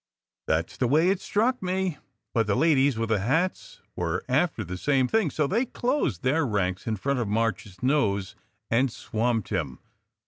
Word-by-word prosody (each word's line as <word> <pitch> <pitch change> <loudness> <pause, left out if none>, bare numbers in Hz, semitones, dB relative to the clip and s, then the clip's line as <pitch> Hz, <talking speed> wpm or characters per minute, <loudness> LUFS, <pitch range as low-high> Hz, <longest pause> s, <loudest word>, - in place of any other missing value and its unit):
"That 80 +1 0
s - - -14
the 125 - +1
way 155 +7 +4
it 190 -1 0
struck 245 +5 +1
me. 185 -3 -1 0.3
But 115 -3 +1
the 105 - +2
ladies 140 -3 +3
with 115 0 -1
the 110 -2 +2
hats 160 - -1
were 85 -1 -2
after 140 -2 +1
the 90 0 -6
same 130 +6 +2
thing, 215 - +2
so 150 +2 0
they 215 - +1
closed 245 - -1
their 145 +5 +2
ranks 100 -6 -1
in 110 - 0
front 140 +6 -1
of 115 - -1
March 110 -1 0
s 95 +3 -16
nose, 105 -9 +1 0.4
and 125 +2 +3
swamped 115 0 -1
him. 80 - -2
125 Hz, 185 wpm, -26 LUFS, 105-160 Hz, 0.4 s, way